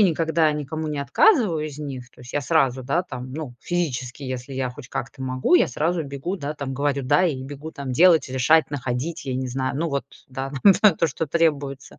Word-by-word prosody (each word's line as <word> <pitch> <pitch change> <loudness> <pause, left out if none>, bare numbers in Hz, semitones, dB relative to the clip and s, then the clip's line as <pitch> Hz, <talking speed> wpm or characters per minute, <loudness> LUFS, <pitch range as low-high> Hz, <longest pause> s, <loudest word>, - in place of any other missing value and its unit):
никогда 165 -4 +3
никому 150 +2 -4
не 150 - -3
отказываю 205 - +3
из 145 -2 -8
них. 135 -4 -6
То - - -19
есть 125 - -11
я 145 - 0
сразу, 135 -3 +2
да, 140 +8 0
там, 130 -5 -8
ну, 150 -6 -6
физически, 140 -7 -3
если 130 0 -5
я 130 -1 -1
хоть 125 -1 -11
как-то 135 +2 -5
могу, 130 +4 +1
я - - +3
сразу 160 +6 0
бегу, 140 +7 -4
да, 150 -3 -4
там, 140 -3 -5
говорю: 140 +1 0
"Да!" 130 +8 +3
И 135 -5 -2
бегу 145 +3 -8
там 140 -4 -5
делать, 165 -2 +5
решать, 145 +5 +3
находить, 140 +3 -3
я 130 - -2
не 130 0 -2
знаю. 130 +1 -2
Ну 165 0 -1
вот, 140 -1 -1 0.2
да, 135 +1 -5
да 205 0 +7
то, 165 - +1
что 160 +2 -3
требуется. 145 -4 -1
140 Hz, 210 wpm, -23 LUFS, 130-160 Hz, 0.2 s, да